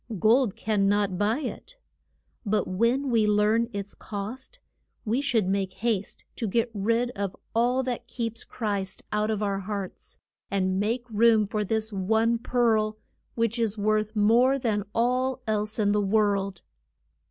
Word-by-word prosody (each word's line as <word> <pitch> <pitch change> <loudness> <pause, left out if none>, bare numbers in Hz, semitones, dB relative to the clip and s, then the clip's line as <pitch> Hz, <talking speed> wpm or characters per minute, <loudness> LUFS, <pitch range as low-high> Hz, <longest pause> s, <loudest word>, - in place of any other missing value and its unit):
Gold 225 +2 +3
can 210 -3 +1
not 200 -2 +1
buy 215 +7 +1
it. - - -7 0.7
But 215 -1 0
when 240 +8 +1
we 220 -2 +3
learn 210 +3 +2
its 200 -1 -5
cost 220 - -7 0.5
we 230 +5 +1
should 235 -9 +1
make 190 -1 -1
haste 210 -2 -2
to 225 - -2
get 230 +3 0
rid 230 +4 0
of 200 -4 -4 0.2
all 245 +3 +2
that 245 -1 -4
keeps 230 -1 -4
Christ 200 -4 -3
out 210 0 0
of 215 -1 -1
our 200 -1 0
hearts, 200 -1 -6 0.3
and 190 -1 0
make 230 +4 -1
room 220 -1 +4
for 210 +1 -2
this 220 +1 -1
one 220 +4 +1
pearl, 225 -3 +1 0.4
which 230 0 0
is 220 -2 0
worth 215 +1 0
more 235 +6 +4
than 215 -6 -1
all 255 +2 +1
else 215 0 -1
in 205 -2 +2
the 210 0 +2
world. 200 -2 +1
215 Hz, 155 wpm, -26 LUFS, 205-235 Hz, 0.7 s, room